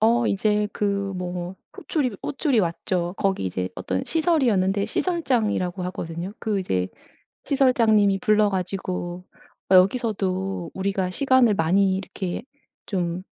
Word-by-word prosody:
어. 230 +2 +3
이제 210 +1 +1
그 200 -1 -1
뭐 180 0 -4 0.2
호출이 260 - -1
호출이 275 -3 0
왔죠. 175 0 -1
거기 195 - 0
이제 90 0 -2
어떤 95 0 -2
시설이었는데 230 - +2
시설장이라고 225 - 0
하거든요. 175 0 -5
그 215 -3 -1
이제 95 - -1 0.6
시설장님이 225 -7 +3
불러 215 -2 +3
가지고 180 -1 -3 0.5
"여기서도 190 -3 +2
우리가 190 -1 -1
시간을 255 0 +3
많이 190 +4 +3
이렇게 190 -1 -5 0.4
좀 180 -2 -2
195 Hz, 285 characters per minute, -24 LUFS, 180-220 Hz, 0.6 s, 어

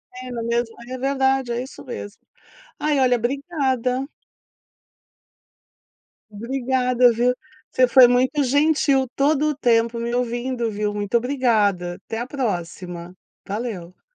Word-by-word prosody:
É 255 0 -8
na 230 -1 -4
mesma 235 0 -1
é 255 - -5
verdade, 265 -1 +1
é 240 +2 -2
isso 265 - -11
mesmo. 205 -4 -8 0.6
Ai 295 -2 +1
olha 250 -1 +4
obrigada. 265 -1 -1 2.3
Obrigada 250 +2 +1
viu, 245 +2 +2 0.4
você 255 - +3
foi 250 -1 +8
muito 255 +4 +2
gentil 285 0 +2
todo 295 +2 +2
o 295 - -2
tempo 235 -2 +2
me 235 +1 -3
ouvindo, 240 -1 -2
viu, 210 0 -2
muito 205 +3 0
obrigada, 215 -9 0
até 225 - -4
à 240 - -3
próxima, 180 -8 -4 0.3
valeu. 200 -4 -6
245 Hz, 125 wpm, -22 LUFS, 230-265 Hz, 2.3 s, foi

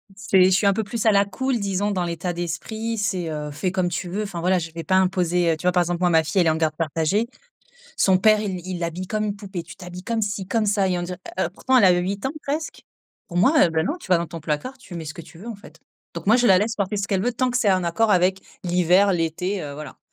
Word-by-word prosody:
C'est 195 -2 +3
je 185 - +5
suis 190 +2 +3
un 200 - +4
peu 220 - -1
plus 225 +2 -4
à 220 - +6
la 200 -1 +4
cool, 260 +5 -2
disons 200 0 -1
dans 185 -3 -1
l'état 175 +1 -3
d'esprit. 220 +7 -4
C'est, 190 -5 -1
heu, 150 -1 -4
fais 155 +5 -2
comme 185 -2 0
tu 175 +1 -4
veux. 205 +4 -2
Enfin 190 -5 -5
voilà, 180 +1 +2
je 165 -1 -6
vais 165 0 -6
pas 185 - +1
imposer, 180 -2 +2
heu, - - -4
tu - - -12
vois 180 - +4
par 180 - +3
exemple, 175 0 -2
moi 180 - +3
ma 160 -1 +4
fille, 160 +5 +1
elle 170 - +2
est - - +5
en 155 - +2
garde 160 -1 0
partagée. 165 +7 0 0.7
Son 190 -1 +4
père, 215 +2 +4
il 190 -4 -3
il 185 -1 -4
l'habille 175 +2 -4
comme 215 +1 -1
une 205 -1 -2
poupée: 195 -4 -6
«Tu 165 0 -12
t'habilles 180 0 -9
comme 230 +1 -1
ci 200 -2 -2
comme 225 +1 +1
ça», 200 -1 +2
et 180 -1 0
on - - -3
dirait, 180 +1 -5 0.2
heu, 175 - +1
pourtant, 260 +5 +2
elle 210 - +6
a 185 - +7
8 195 +4 -3
ans 265 - 0
presque. 300 +3 -4 0.4
Pour 175 - -4
moi, 210 - +4
heu, - - +1
ben 160 0 0
non, 305 - -2
tu - - -13
vas 180 -2 +4
dans 170 0 -3
ton 165 +1 -7
placard, 160 - -3
tu 250 -8 -11
mets 165 -1 -6
ce 155 - -6
que 170 - -9
tu 165 - -15
veux 200 +7 -10
en 230 - -5
fait, 200 - -16 0.4
donc - - -6
moi, 215 +4 +5
je 245 -1 +3
la 190 -2 +7
laisse 215 +4 0
porter 200 0 -2
ce 200 0 -2
qu'elle 195 -2 0
veut 245 +4 0
tant 255 +1 0
que 245 - +1
c'est 210 -5 +3
en 185 -1 +1
accord 175 +7 +1
avec 185 -1 +3 0.2
l'hiver, 180 +2 +3
l'été, 175 +4 -1
heu, 145 -2 -6
voilà. 150 -1 -9
185 Hz, 295 wpm, -23 LUFS, 170-205 Hz, 0.7 s, a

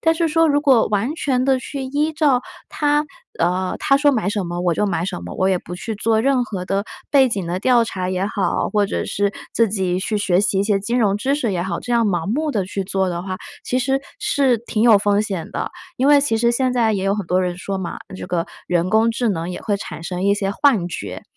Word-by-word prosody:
但 325 0 +3
是 330 -1 +1
说 325 +1 +3
如 290 -1 +2
果 265 -6 +4
完 215 +7 0
全 255 -5 0
地 265 -1 +3
去 270 +2 -6
依 295 +4 -1
照 285 -5 +2 0.3
它 295 0 +1 0.4
呃， 180 +2 0
它 275 - +3
说 290 0 +4
买 220 -5 0
什 205 -2 -1
么 175 0 -4
我 175 -2 +1
就 210 +4 +1
买 170 -3 -1
什 185 - -3
么， 90 - -7
我 190 - +2
也 185 -2 +2
不 175 - -8
去 215 +4 -5
做 220 +1 +1
任 260 0 +2
何 190 -5 -5
的 195 +2 -1 0.3
背 270 -3 +5
景 200 -5 -2
的 180 +2 -1
调 240 +2 +4
查 185 -5 -3
也 185 +1 -1
好， 200 -2 -1
或 205 -2 +1
者 - - -2
是 205 0 -1 0.2
自 230 -2 +3
己 185 -3 -1
去 210 +3 -2
学 185 -2 +2
习 200 -1 +1
一 - - +3
些 200 -1 +1
金 235 +5 -1
融 200 -3 +2
知 265 +7 0
识 255 -7 -1
也 175 - -1
好， 180 -2 -3
这 245 - -4
样 230 -2 +3
盲 175 -4 -1
目 300 +9 0
地 200 -4 0
去 195 0 -3
做 190 -1 0
的 175 0 -3
话， 185 0 -4 0.3
其 255 - 0
实 270 +2 0 0.2
是 265 -5 +2
挺 225 -1 -2
有 225 -4 +7
风 205 0 +2
险 190 -6 -4
的。 - - -3 0.3
因 260 - +1
为 290 -1 +6
其 250 -6 +1
实 235 +1 +2
现 255 +1 +1
在 230 -3 +2
也 195 -2 -1
有 195 +1 +2
很 205 -3 -3
多 180 +2 +2
人 175 -1 -2
说 195 +1 -4
嘛， 180 -3 -5 0.2
这 - - -7
个 170 -2 -1 0.2
人 175 +1 0
工 225 +1 +4
智 240 0 0
能 170 -4 -2
也 180 - -5
会 205 -2 0
产 165 - -8
生 180 +2 -3
一 200 0 +4
些 195 -1 -1
幻 205 -5 +2
觉， 175 - -6
210 Hz, 275 characters per minute, -20 LUFS, 185-255 Hz, 0.4 s, 有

